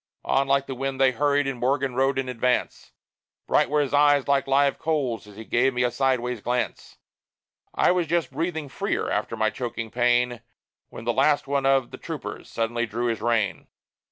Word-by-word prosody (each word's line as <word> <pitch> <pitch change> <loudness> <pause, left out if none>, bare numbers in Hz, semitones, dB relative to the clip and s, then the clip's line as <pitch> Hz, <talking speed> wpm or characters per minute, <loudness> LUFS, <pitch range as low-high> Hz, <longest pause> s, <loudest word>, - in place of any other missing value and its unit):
On 135 0 +2
like 140 0 +2
the 135 - -5
wind 135 +1 -4
they 135 -1 +5
hurried, 145 +2 +1
and 135 -3 -3
Morgan 135 +1 0
rode 135 +1 +1
in 135 -1 -1
advance; 125 0 -1 0.5
Bright - - +2
were 150 +1 +2
his 140 -2 -2
eyes 145 -1 +4
like 140 -1 +2
live 140 +1 +2
coals, 140 -9 -1
as 105 - -14
he 110 +2 -9
gave 125 +3 +1
me 125 - +1
a 125 - +1
sideways 125 -2 0
glance; 125 +2 -3 0.8
I - - +4
was 180 -2 0
just 170 -1 0
breathing 160 +1 -3
freely, - - -2
after - - -2
my 110 0 +1
choking 115 -1 -5
pain, 120 0 +1 0.5
When - - -9
the 120 - +1
last 145 +4 +2
one 140 -1 0
of 135 -2 +2
the - - -9
troopers - - -7
suddenly 120 +1 -1
drew 120 +3 -2
his 115 - -2
rein. 115 -3 0
130 Hz, 190 wpm, -25 LUFS, 120-140 Hz, 0.8 s, they